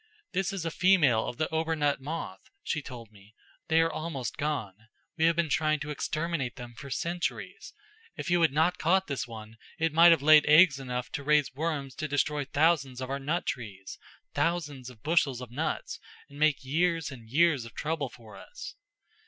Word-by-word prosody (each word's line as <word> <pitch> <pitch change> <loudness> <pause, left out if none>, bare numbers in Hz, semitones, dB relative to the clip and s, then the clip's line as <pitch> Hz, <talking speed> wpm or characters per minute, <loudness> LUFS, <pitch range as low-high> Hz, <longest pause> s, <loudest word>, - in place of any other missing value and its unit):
'This 190 0 0
is 190 -4 -4
a 165 - -1
female 160 -12 +3
of 120 - -5
the 155 - 0
obernut 160 -3 0
moth,' 155 +5 -6
she 155 - -2
told 120 -5 -10
me. 105 +1 -19 0.3
'They 160 +1 +4
are 165 0 +1
almost 155 -6 -4
gone. 145 -10 -2 0.4
We 160 - +2
have 165 0 +4
been 170 0 +1
trying 155 0 +1
to 150 +1 -4
exterminate 155 -3 -2
them 120 -2 -9
for 140 +4 -10
centuries. 175 - -4 0.4
If - - -6
you 175 -1 +3
had 160 -4 +4
not 160 +5 +1
caught 190 +4 +2
this 135 -7 -3
one, 110 -1 -10 0.2
it 165 -1 0
might 170 +2 +8
have 165 -4 +4
laid 155 0 +7
eggs 150 -1 +6
enough 125 -2 -4
to 140 - -4
raise 150 -2 +2
worms 145 -2 -3
enough - - -24
to 155 - -2
destroy 145 0 0
thousands 145 -3 +1
of 130 0 -5
our 140 - -2
nut 155 +6 -2
trees 100 -6 -6 0.3
thousands 150 -7 -1
of 120 -4 -16
bushels 150 -5 +2
of 125 -2 -9
nuts 155 +6 -3 0.3
and 140 0 -13
make 150 -4 +2
years 165 +2 0
and 115 -4 -12
years 150 -1 +3
of 115 - -12
trouble 150 -3 -2
for 115 -3 -14
us. - - -9
150 Hz, 195 wpm, -29 LUFS, 130-165 Hz, 0.4 s, might